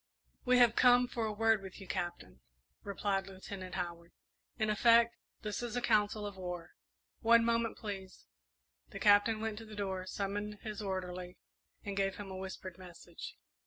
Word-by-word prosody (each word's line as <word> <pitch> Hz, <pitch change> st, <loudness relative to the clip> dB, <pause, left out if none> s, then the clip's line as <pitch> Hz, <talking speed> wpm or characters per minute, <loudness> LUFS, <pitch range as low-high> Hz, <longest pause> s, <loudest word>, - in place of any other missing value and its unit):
"We 250 Hz, 0 st, +5 dB
have 240 Hz, -2 st, +6 dB
come 245 Hz, 0 st, +6 dB
for 230 Hz, -2 st, -2 dB
a -, -, -1 dB
word 225 Hz, 0 st, +3 dB
with 190 Hz, -1 st, -9 dB
you, 195 Hz, -, -10 dB
Captain," 175 Hz, -1 st, -4 dB, 0.4 s
replied 200 Hz, -1 st, -1 dB
Lieutenant 190 Hz, -1 st, -7 dB
Howard. 170 Hz, -2 st, -5 dB, 0.4 s
"In 215 Hz, -2 st, +1 dB
effect, 235 Hz, +2 st, +5 dB, 0.3 s
this 210 Hz, 0 st, -3 dB
is 240 Hz, -1 st, -4 dB
a -, -, +2 dB
council 210 Hz, -3 st, +2 dB
of 200 Hz, -2 st, -6 dB
war." 180 Hz, -2 st, -5 dB, 0.5 s
"One 230 Hz, 0 st, +5 dB
moment 230 Hz, 0 st, +1 dB
please." 195 Hz, -3 st, -7 dB, 0.6 s
The -, -, -7 dB
Captain 205 Hz, +2 st, +5 dB
went 220 Hz, -1 st, -2 dB
to 225 Hz, -, -9 dB
the 215 Hz, -1 st, -10 dB
door, 190 Hz, -2 st, -3 dB
summoned 205 Hz, +2 st, -3 dB
his 215 Hz, -1 st, -5 dB
orderly, 180 Hz, -2 st, -4 dB, 0.5 s
and 200 Hz, -1 st, -4 dB
gave 195 Hz, -1 st, +1 dB
him 200 Hz, -2 st, -7 dB
a -, -, -5 dB
whispered 190 Hz, -1 st, -7 dB
message. 175 Hz, -2 st, -10 dB
205 Hz, 165 wpm, -34 LUFS, 185-225 Hz, 0.6 s, have